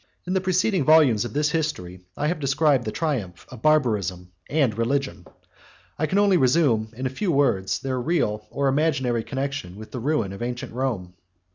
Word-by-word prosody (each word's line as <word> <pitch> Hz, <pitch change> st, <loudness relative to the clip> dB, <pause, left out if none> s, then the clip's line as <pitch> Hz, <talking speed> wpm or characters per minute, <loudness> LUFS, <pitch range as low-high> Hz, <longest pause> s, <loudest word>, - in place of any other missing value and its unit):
In 180 Hz, -, -2 dB
the 190 Hz, -, +1 dB
preceding 185 Hz, -1 st, +1 dB
volumes 140 Hz, -8 st, +5 dB
of 115 Hz, -, -6 dB
this 150 Hz, 0 st, +1 dB
History, 95 Hz, -, -3 dB, 0.2 s
I 150 Hz, -, -1 dB
have 165 Hz, +2 st, 0 dB
described 140 Hz, -2 st, +2 dB
the 110 Hz, -, -2 dB
triumph 115 Hz, -, -3 dB
of 125 Hz, -4 st, -11 dB
barbarism 105 Hz, -, +1 dB, 0.2 s
and 140 Hz, -8 st, +1 dB
religion; 135 Hz, +4 st, -1 dB
and -, -, -19 dB, 0.7 s
I 155 Hz, -, +1 dB
can 190 Hz, -, 0 dB
only 200 Hz, -2 st, +4 dB
resume, 125 Hz, -6 st, +2 dB
in 130 Hz, -, -4 dB
a -, -, +1 dB
few 180 Hz, +7 st, -1 dB
words, 135 Hz, -10 st, +1 dB
their 130 Hz, -2 st, -3 dB
real 105 Hz, -9 st, -1 dB
or 140 Hz, +1 st, -1 dB
imaginary 130 Hz, -5 st, +1 dB
connection 135 Hz, -9 st, -4 dB
with 110 Hz, +1 st, -11 dB
the 125 Hz, -, -5 dB
ruin 115 Hz, -7 st, -1 dB
of 100 Hz, -, -9 dB
ancient 120 Hz, 0 st, -4 dB
Rome. 115 Hz, -9 st, -3 dB
135 Hz, 185 wpm, -24 LUFS, 110-155 Hz, 0.7 s, volumes